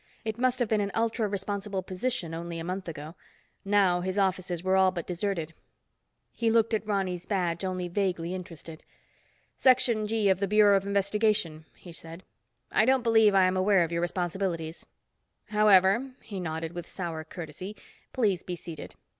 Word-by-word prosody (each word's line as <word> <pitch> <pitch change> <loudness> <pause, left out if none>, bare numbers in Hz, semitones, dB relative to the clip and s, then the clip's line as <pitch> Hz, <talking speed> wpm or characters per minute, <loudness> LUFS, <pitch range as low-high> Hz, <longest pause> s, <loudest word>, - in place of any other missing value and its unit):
It 220 +1 -3
must 255 0 +2
have 245 -2 0
been 215 -1 +1
an 200 - -1
ultra 225 -1 0
responsible 200 -1 -3
position 185 -2 -2
only 170 +1 -5
a 165 - -5
month 185 +2 -4
ago. 155 -1 -7 0.5
Now 195 -3 +3
his 185 +2 -3
offices 185 -3 0
were 190 0 +2
all 190 0 +5
but 175 -3 -5
deserted. 175 -3 -3 0.8
He 230 -1 0
looked 230 0 +3
at 215 -1 -1
Ronny's 185 -4 -2
badge, 180 -4 -1
only 185 -1 -2
vaguely 180 -2 -1
interested. 165 -3 -8 0.8
"Section 245 -4 +3
G 220 -1 +1
of 190 -1 +3
the 200 - 0
Bureau 210 0 +5
of 195 0 0
Investigation," 200 -5 +1
he 175 - -12
said. 165 +2 -9 0.5
"I - - +4
don't 260 +1 +3
believe 220 -3 +5
I 190 - +6
am 185 0 +2
aware 190 -1 +4
of 165 - -3
your 170 0 -1
responsibilities. 175 -2 -2 0.6
However," 210 +4 +4
he 200 -3 -6
nodded 160 -1 -4
with 175 -1 -6
sour 165 -4 -5
courtesy, 175 +5 -8 0.4
"please 205 -8 +1
be 180 - -5
seated. 165 -2 -9
190 Hz, 170 wpm, -28 LUFS, 175-210 Hz, 0.8 s, I